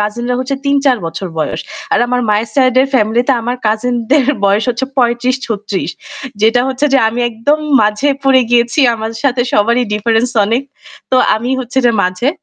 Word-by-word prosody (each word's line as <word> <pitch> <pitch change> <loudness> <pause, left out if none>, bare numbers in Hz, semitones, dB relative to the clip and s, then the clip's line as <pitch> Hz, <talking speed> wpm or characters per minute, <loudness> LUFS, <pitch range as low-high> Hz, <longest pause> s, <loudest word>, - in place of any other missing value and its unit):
কাজিনরা 240 +4 -2
হচ্ছে 260 +2 -2
৩-৪ 280 -2 +2
বছর 165 +4 -5
বয়স। 155 - -2 0.3
আর - - +3
আমার 250 0 0
মায়ের 215 +2 0
সাইডের 260 -1 +3
ফ্যামিলিতে 240 +3 +2
আমার 245 +2 -2
কাজিন 225 +3 0 0.2
দের 285 -4 +4 0.2
বয়স 200 +2 +2
হচ্ছে 245 +2 -1
৩৫-৩৬ 235 -6 -1 0.5
যেটা 225 +2 +4
হচ্ছে 265 +2 0
যে 270 - +5
আমি 235 +2 -3
একদম 235 +7 0 0.2
মাঝে 210 +7 +1
পড়ে 270 -1 +4
গিয়েছি। 240 +4 +2
আমার 220 0 -5
সাথে 260 -3 +1
সবারই 235 +4 +2
difference 225 +3 0
অনেক। 230 +6 0 0.5
তো 260 - +3 0.2
আমি 240 +3 -4
হচ্ছে 260 +1 -3
যে 235 - +3
মাঝে, 185 +8 -1
240 Hz, 165 wpm, -14 LUFS, 220-255 Hz, 0.5 s, যে